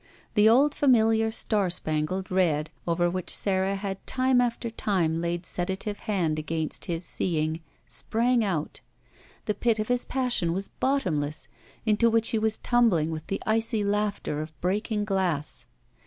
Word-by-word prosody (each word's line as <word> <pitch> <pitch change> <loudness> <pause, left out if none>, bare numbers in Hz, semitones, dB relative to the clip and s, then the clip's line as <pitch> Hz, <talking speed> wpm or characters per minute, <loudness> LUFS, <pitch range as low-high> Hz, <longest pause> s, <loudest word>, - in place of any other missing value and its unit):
The 210 0 +6
old 275 +6 +5
familiar 225 -5 +3
star 210 -3 0
spangled 170 +3 -2
red 160 -5 +1 0.2
over 175 +1 +2
whidi 180 0 -3
Sara 190 0 +2
had 195 -1 -5
time 255 -1 +3
after 235 -1 -1
time 180 -8 0
laid 170 +1 -2
sedative 190 +4 -3
hand 170 -7 0
against 155 +1 -3
his 170 0 -3
seeing, 160 -2 -1 0.3
sprang 235 +1 +1
out. 170 -7 -2 0.7
The 210 - 0
pit 230 +1 +1
of 215 +1 -3
his 245 0 +2
passion 245 -10 0
was 195 +2 -2
bottomless, 155 - -1 0.4
into 220 +1 +4
which 230 0 +2
he 225 - +1
was 220 0 +1
tumbling 215 -11 +2
with 155 0 -6
the 195 - -3
icy 220 0 +1
laughter 205 -7 -1
of 155 -2 -9
breaking 210 +3 -1
glass. 185 -7 -1
195 Hz, 150 wpm, -27 LUFS, 170-225 Hz, 0.7 s, The